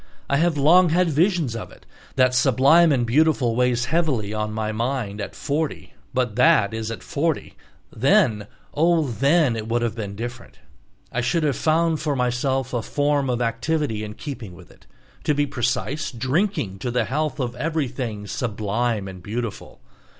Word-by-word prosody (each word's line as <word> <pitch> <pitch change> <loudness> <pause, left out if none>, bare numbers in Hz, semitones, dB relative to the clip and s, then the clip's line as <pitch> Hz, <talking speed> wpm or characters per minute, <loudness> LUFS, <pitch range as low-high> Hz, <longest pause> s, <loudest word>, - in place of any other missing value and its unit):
I 140 - +3
have 165 0 +2
long 170 +5 +5
had 170 +1 +2
visions 160 - +1
of 115 - -6
it. - - -18 0.3
That 130 -1 +3
"sublime 135 +6 +5
and 125 -4 +2
beautiful" 130 -2 +2
weighs 125 0 +1
heavily 135 -10 0
on 105 0 -2
my 110 0 -2
mind 115 -2 -2
at 100 - -6
forty 150 +2 -3 0.2
But 125 -4 -1
that 110 -4 +4
is 110 0 -3
at 115 - -6
forty; 155 +1 -2 0.4
then—oh, 150 - +1
then 140 +2 +2
it 110 -1 -5
would 120 +1 0
have 115 - -1
been 105 -3 -6
different! 120 +2 -7 0.5
I 125 - -1
should 125 +7 0
have 145 -4 +1
found 160 0 +1
for 150 -2 -1
myself 130 +1 -1
a 120 - 0
form 145 +2 0
of 125 -1 0
activity 115 0 -1
in 105 0 -7
keeping 115 - -7
with - - -15
it, - - -22 0.4
to 150 - +1
be 145 0 +2
precise, 125 +3 -2
drinking 130 - -1
to 125 - -3
the 120 -1 0
health 150 +4 -2
of 125 -2 -2
everything 130 -7 -3
"sublime 110 0 -2
and 95 -1 -9
beautiful." 115 +3 -6
125 Hz, 165 wpm, -23 LUFS, 115-150 Hz, 0.5 s, long